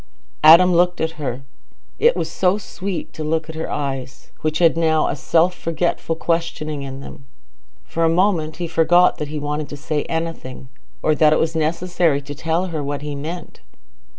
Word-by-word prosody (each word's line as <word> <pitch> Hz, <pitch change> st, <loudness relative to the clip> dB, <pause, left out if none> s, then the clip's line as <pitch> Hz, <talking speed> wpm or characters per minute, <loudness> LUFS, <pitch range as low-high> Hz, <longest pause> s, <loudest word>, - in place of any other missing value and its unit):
Adam 170 Hz, +4 st, +8 dB
looked 175 Hz, +1 st, +2 dB
at 160 Hz, 0 st, -3 dB
her. 130 Hz, 0 st, -3 dB, 0.6 s
It 475 Hz, +2 st, +4 dB
was -, -, -2 dB
so 185 Hz, +1 st, +1 dB
sweet 195 Hz, -3 st, -5 dB
to 155 Hz, -, -6 dB
look 160 Hz, +1 st, -1 dB
at 160 Hz, -, -7 dB
her 160 Hz, -, -4 dB
eyes, 135 Hz, -3 st, -5 dB
which 155 Hz, 0 st, 0 dB
had 165 Hz, -2 st, +4 dB
now 160 Hz, -2 st, +2 dB
a -, -, -1 dB
self 165 Hz, +5 st, +2 dB
forgetful 165 Hz, -1 st, -2 dB
questioning 160 Hz, -3 st, -2 dB
in 135 Hz, 0 st, -7 dB
them—for 135 Hz, -, -9 dB
a 165 Hz, -, +4 dB
moment 165 Hz, -3 st, +1 dB
he 175 Hz, -1 st, -3 dB
forgot 170 Hz, +2 st, +3 dB
that 150 Hz, -, -3 dB
he 150 Hz, +1 st, -5 dB
wanted 150 Hz, 0 st, -3 dB
to 145 Hz, -, -7 dB
say 150 Hz, +1 st, -2 dB
anything, 160 Hz, -6 st, -5 dB, 0.3 s
or 155 Hz, -, +3 dB
that 150 Hz, 0 st, +4 dB
it -, -, +2 dB
was 160 Hz, 0 st, 0 dB
necessary 165 Hz, -1 st, +1 dB
to 145 Hz, +1 st, -8 dB
tell 165 Hz, +5 st, -1 dB
her 155 Hz, -2 st, -2 dB
what 145 Hz, 0 st, -4 dB
he 150 Hz, -1 st, -4 dB
meant. 160 Hz, +5 st, -7 dB
160 Hz, 180 wpm, -20 LUFS, 145-170 Hz, 0.6 s, Adam